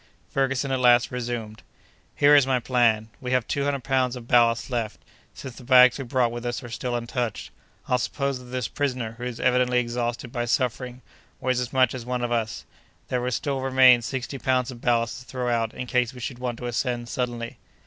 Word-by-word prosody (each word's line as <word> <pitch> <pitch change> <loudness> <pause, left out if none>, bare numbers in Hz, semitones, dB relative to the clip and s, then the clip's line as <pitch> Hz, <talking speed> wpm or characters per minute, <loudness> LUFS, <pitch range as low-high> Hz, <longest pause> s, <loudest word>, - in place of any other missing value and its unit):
Ferguson 135 0 0
at 130 - 0
last 120 -1 +4
resumed: 115 -3 -4 0.5
"Here 145 +1 +6
is 140 -2 +5
my 130 -1 +2
plan: 115 -3 +2
We 125 -1 -2
have 125 -3 +1
two 140 -1 -1
hundred 140 -3 -1
pounds 130 -1 +1
of 120 -2 -9
ballast 115 0 +3
left, 115 -3 -2 0.4
since 130 -3 -8
the 130 - -11
bags 125 +1 +6
we - - -3
brought 125 -2 +1
with 120 0 -6
us 120 0 -3
are 120 - -9
still 120 +1 -3
untouched. 120 -1 -3 0.4
I'll 125 -2 +2
suppose 140 +1 -2
that 125 - -12
this 125 -2 -3
prisoner, 125 -6 -2
who - - -6
is 125 -2 -5
evidently 125 0 +2
exhausted 120 0 -2
by 120 -1 -2
suffering, 125 +1 -2 0.4
weighs 130 -1 0
as 125 -1 -3
much 130 -2 +3
as 130 -2 -6
one 125 0 -3
of 120 - -2
us; 115 -2 -2 0.4
there 125 - 0
will 125 - -1
still 135 +2 -2
remain 130 -2 +6
sixty 130 +3 -4
pounds 130 0 0
of 120 -2 -11
ballast 115 0 +1
to 125 - -14
throw 125 0 -2
out, 115 -1 0
in 125 - -5
case 125 +1 0
we - - -9
should 125 0 -5
want 125 -2 -3
to 125 - -7
ascend 120 0 -2
suddenly." 120 -1 -4
125 Hz, 210 wpm, -25 LUFS, 120-130 Hz, 0.5 s, Here